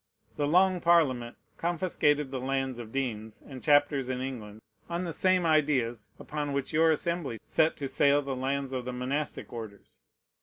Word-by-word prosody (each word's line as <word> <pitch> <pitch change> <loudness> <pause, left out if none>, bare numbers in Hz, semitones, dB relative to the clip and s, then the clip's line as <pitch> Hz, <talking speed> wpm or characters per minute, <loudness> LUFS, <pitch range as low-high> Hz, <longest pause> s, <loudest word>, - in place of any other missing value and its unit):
The 145 - 0
Long 185 +3 +4
Parliament 135 -9 +2 0.2
confiscated 155 -5 +1
the 130 - -3
lands 135 -1 -2
of 115 -2 -8
deans 110 -5 -4
and 130 -3 -9
chapters 145 -3 +3
in 130 -1 -2
England 115 -5 -6 0.3
on 170 +1 -2
the 170 -2 -3
same 185 +1 +2
ideas 130 -9 +1
upon 145 -1 -4
which 140 +1 -2
your 160 +1 +4
Assembly 160 -5 -1
set 160 +1 +2
to 140 - -3
sale 140 +2 +3
the 135 -1 -3
lands 135 +1 -2
of 130 -2 -3
the 125 - -4
monastic 135 +4 -3
orders. 110 -4 -9
140 Hz, 165 wpm, -29 LUFS, 125-155 Hz, 0.3 s, Long